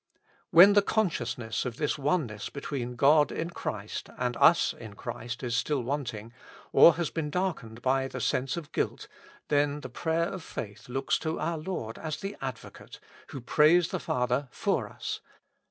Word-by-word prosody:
" -, -, -33 dB
When 185 Hz, +5 st, +8 dB
the 205 Hz, -, +6 dB
consciousness 125 Hz, -, -1 dB
of 125 Hz, -3 st, -5 dB
this 150 Hz, -, 0 dB
oneness 135 Hz, -, -1 dB
between 130 Hz, -3 st, -5 dB
God 145 Hz, +4 st, +5 dB
in 165 Hz, +1 st, -3 dB
Christ 105 Hz, -, -5 dB
and 125 Hz, -1 st, -1 dB
us 165 Hz, -2 st, +5 dB
in 110 Hz, -3 st, -11 dB
Christ 120 Hz, +3 st, -6 dB
still 130 Hz, +3 st, 0 dB
is -, -, -8 dB
wanting, 120 Hz, -5 st, -4 dB, 0.4 s
or 170 Hz, -, +8 dB
has 170 Hz, -1 st, -2 dB
been 160 Hz, -3 st, -2 dB
darkened 145 Hz, -11 st, -3 dB
by 135 Hz, +1 st, +2 dB
the 130 Hz, -, -6 dB
sense 130 Hz, +5 st, 0 dB
of 160 Hz, -4 st, -7 dB
guilt, -, -, -2 dB, 0.4 s
then 145 Hz, 0 st, +1 dB
the 130 Hz, -, -7 dB
prayer 165 Hz, +5 st, 0 dB
of 190 Hz, -, -6 dB
faith 110 Hz, -3 st, -8 dB
looks 135 Hz, +2 st, 0 dB
to 160 Hz, +1 st, -3 dB
our 165 Hz, +1 st, -1 dB
Lord 155 Hz, -10 st, -5 dB
as 155 Hz, -2 st, -4 dB
the 195 Hz, +1 st, -5 dB
Advocate, 130 Hz, -3 st, -8 dB, 0.3 s
who 135 Hz, -, -7 dB
prays 155 Hz, +7 st, +4 dB
the -, -, -2 dB
Father 125 Hz, +2 st, -1 dB
/or -, -, -1 dB
us. -, -, -5 dB
140 Hz, 170 wpm, -28 LUFS, 120-160 Hz, 0.4 s, When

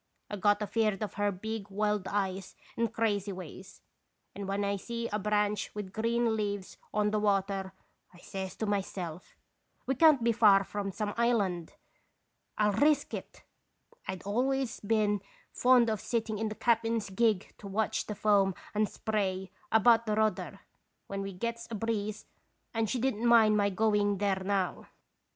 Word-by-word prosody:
I -, -, -2 dB
got 205 Hz, +1 st, +2 dB
afeard 215 Hz, -1 st, 0 dB
of 210 Hz, -, -4 dB
her 205 Hz, 0 st, 0 dB
big, 205 Hz, +2 st, -5 dB
wild 210 Hz, -1 st, 0 dB
eyes 195 Hz, -2 st, -2 dB, 0.2 s
and 230 Hz, -2 st, 0 dB
crazy 210 Hz, -3 st, 0 dB
ways, 185 Hz, +1 st, -10 dB, 0.5 s
and 200 Hz, -1 st, -6 dB
when 200 Hz, +1 st, -1 dB
I 200 Hz, 0 st, 0 dB
see 235 Hz, +3 st, -4 dB
a 210 Hz, -, -1 dB
branch 210 Hz, 0 st, 0 dB
with 200 Hz, -3 st, -6 dB
green 230 Hz, 0 st, +1 dB
leaves 205 Hz, -3 st, -3 dB
on 210 Hz, 0 st, +1 dB
the 215 Hz, -, +1 dB
water, 195 Hz, -2 st, 0 dB, 0.4 s
I 180 Hz, -, -17 dB
says 190 Hz, +1 st, -6 dB
to 220 Hz, -, -3 dB
myself: 190 Hz, -4 st, -4 dB, 0.3 s
" -, -, -43 dB
'We 265 Hz, -, +1 dB
can't 305 Hz, -6 st, +6 dB
be 235 Hz, -, +4 dB
far 210 Hz, -3 st, +6 dB
from 200 Hz, 0 st, -4 dB
some 205 Hz, +1 st, -3 dB
island; 200 Hz, -8 st, +1 dB, 0.8 s
I'll 210 Hz, -1 st, +3 dB
risk 290 Hz, +7 st, +2 dB
it -, -, -7 dB, 0.6 s
I -, -, -1 dB
1 -, -, -6 dB
I'd -, -, -15 dB
always 255 Hz, +4 st, 0 dB
been 210 Hz, -1 st, +1 dB, 0.3 s
fond 250 Hz, -1 st, +4 dB
of 215 Hz, -3 st, -1 dB
sitting 225 Hz, -3 st, -2 dB
in 220 Hz, 0 st, -1 dB
the 215 Hz, -, -6 dB
cap'n's 225 Hz, -3 st, +1 dB
gig 210 Hz, -1 st, +1 dB
to 205 Hz, -, -9 dB
watch 210 Hz, +2 st, -1 dB
the 210 Hz, -, -4 dB
foam 200 Hz, -2 st, +3 dB, 0.2 s
and 210 Hz, 0 st, +1 dB
spray 190 Hz, -4 st, -2 dB, 0.2 s
about 230 Hz, +1 st, +5 dB
the 210 Hz, -, +1 dB
rudder 215 Hz, -3 st, -1 dB, 0.4 s
when 195 Hz, 0 st, -4 dB
we 195 Hz, 0 st, -4 dB
gets 230 Hz, +5 st, -4 dB
a 230 Hz, -, -4 dB
breeze, 215 Hz, -1 st, -2 dB, 0.5 s
and 225 Hz, -2 st, 0 dB
she 255 Hz, -, 0 dB
did 260 Hz, +2 st, +1 dB
n't 230 Hz, -, -3 dB
mind 225 Hz, -3 st, +6 dB
my 205 Hz, -1 st, +3 dB
going 205 Hz, 0 st, +2 dB
there 195 Hz, -1 st, 0 dB
now. 195 Hz, -1 st, -1 dB
210 Hz, 175 wpm, -30 LUFS, 195-225 Hz, 0.8 s, can't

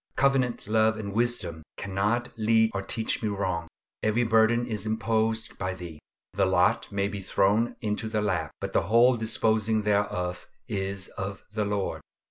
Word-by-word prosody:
Covenant 135 Hz, -3 st, +2 dB
love 110 Hz, 0 st, +3 dB
and 100 Hz, -2 st, -5 dB
wisdom 110 Hz, -8 st, -1 dB, 0.2 s
cannot 105 Hz, +5 st, -1 dB
lead 110 Hz, 0 st, +3 dB
or 95 Hz, -, -1 dB
teach 110 Hz, +3 st, -1 dB
me 110 Hz, -, 0 dB
wrong; 95 Hz, -4 st, -2 dB, 0.3 s
every 110 Hz, +3 st, +2 dB
burden 115 Hz, +1 st, +3 dB
is 110 Hz, -3 st, -4 dB
imposed 110 Hz, 0 st, 0 dB
by 95 Hz, 0 st, -2 dB
Thee. 85 Hz, -4 st, -9 dB, 0.3 s
The -, -, +2 dB
lot -, -, +2 dB
may 100 Hz, 0 st, 0 dB
be 100 Hz, -1 st, -5 dB
thrown 105 Hz, +5 st, +2 dB
into 110 Hz, 0 st, -2 dB
the 110 Hz, -1 st, 0 dB
lap, 85 Hz, -7 st, 0 dB
but -, -, -5 dB
the -, -, +4 dB
whole 120 Hz, +3 st, +6 dB
disposing 110 Hz, -1 st, +1 dB
thereof 100 Hz, -4 st, -1 dB, 0.2 s
is 95 Hz, -1 st, -3 dB
of 95 Hz, +1 st, -6 dB
the 105 Hz, -1 st, 0 dB
Lord. 100 Hz, -1 st, -2 dB
110 Hz, 160 wpm, -27 LUFS, 100-110 Hz, 0.3 s, whole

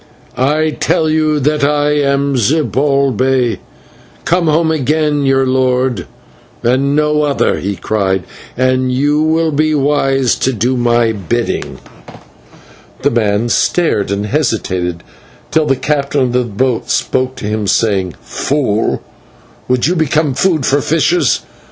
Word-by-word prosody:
"I 155 Hz, +4 st, +1 dB
tell 155 Hz, -1 st, +1 dB
you 155 Hz, -1 st, +1 dB
that 150 Hz, +1 st, 0 dB
I 145 Hz, 0 st, +2 dB
am 140 Hz, -1 st, +1 dB
Zibalbay, 135 Hz, -2 st, +1 dB, 0.7 s
come 175 Hz, -1 st, +1 dB
home 160 Hz, +1 st, +2 dB
again, 150 Hz, -1 st, 0 dB
your 135 Hz, 0 st, +3 dB
lord, 130 Hz, -1 st, 0 dB, 0.6 s
and 135 Hz, +4 st, +1 dB
no 150 Hz, 0 st, +2 dB
other," 145 Hz, -2 st, 0 dB
he 100 Hz, +2 st, -3 dB
cried, 95 Hz, -3 st, -1 dB, 0.3 s
"and 130 Hz, 0 st, +1 dB
you 145 Hz, +4 st, +1 dB
will 160 Hz, +1 st, +1 dB
be 155 Hz, +1 st, +1 dB
wise 135 Hz, -2 st, +1 dB
to 130 Hz, -, 0 dB
do 120 Hz, +3 st, 0 dB
my 120 Hz, -1 st, +2 dB
bidding." 110 Hz, +3 st, -3 dB, 1.3 s
The -, -, +2 dB
man 110 Hz, 0 st, 0 dB
stared, 155 Hz, -, +1 dB
and 100 Hz, +1 st, -2 dB
hesitated, 100 Hz, -, -2 dB, 0.5 s
till 155 Hz, -1 st, +2 dB
the 135 Hz, -, +2 dB
captain 140 Hz, +1 st, -1 dB
of 125 Hz, -2 st, +1 dB
the 125 Hz, 0 st, +1 dB
boat 120 Hz, +2 st, -1 dB
spoke 130 Hz, 0 st, 0 dB
to -, -, -7 dB
him, 105 Hz, 0 st, -2 dB
saying: 95 Hz, -6 st, 0 dB
"Fool, 130 Hz, -7 st, -1 dB, 0.6 s
would 125 Hz, -1 st, +1 dB
you 175 Hz, +4 st, +1 dB
become 155 Hz, -2 st, +1 dB
food 160 Hz, -2 st, +1 dB
for 140 Hz, +1 st, +2 dB
fishes? 165 Hz, -, +1 dB
135 Hz, 135 wpm, -14 LUFS, 120-150 Hz, 1.3 s, your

